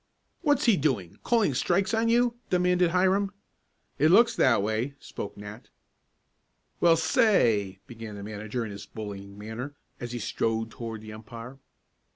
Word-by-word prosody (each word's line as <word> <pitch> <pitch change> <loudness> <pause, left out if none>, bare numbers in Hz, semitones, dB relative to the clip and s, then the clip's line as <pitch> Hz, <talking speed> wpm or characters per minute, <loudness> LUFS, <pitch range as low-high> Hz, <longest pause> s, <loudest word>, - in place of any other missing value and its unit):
"What's 290 -3 +2
he 225 -6 +5
doing, 125 - -1
calling 225 - +2
strikes 180 - +1
on 225 +1 +2
you?" 240 +1 +3 0.2
demanded 180 -1 +3
Hiram. 190 +3 +2 0.7
"It 155 +3 +5
looks 230 +7 +6
that 115 -6 +3
way," 110 +6 -1
spoke 100 - -7
Nat. 105 +3 -10 1.1
"Well, 165 -1 +5
say 160 - +4 0.3
" - - -45
began 115 -3 -9
the 100 - -8
manager 110 +3 -4
in 105 - -6
his 100 - -9
bullying 100 -2 -8
manner, 110 +7 -6 0.2
as 120 -1 -5
he 120 - -3
strode 115 0 -1
toward 115 -2 -6
the 110 0 -9
umpire. 115 +4 -10
125 Hz, 155 wpm, -27 LUFS, 110-180 Hz, 1.1 s, looks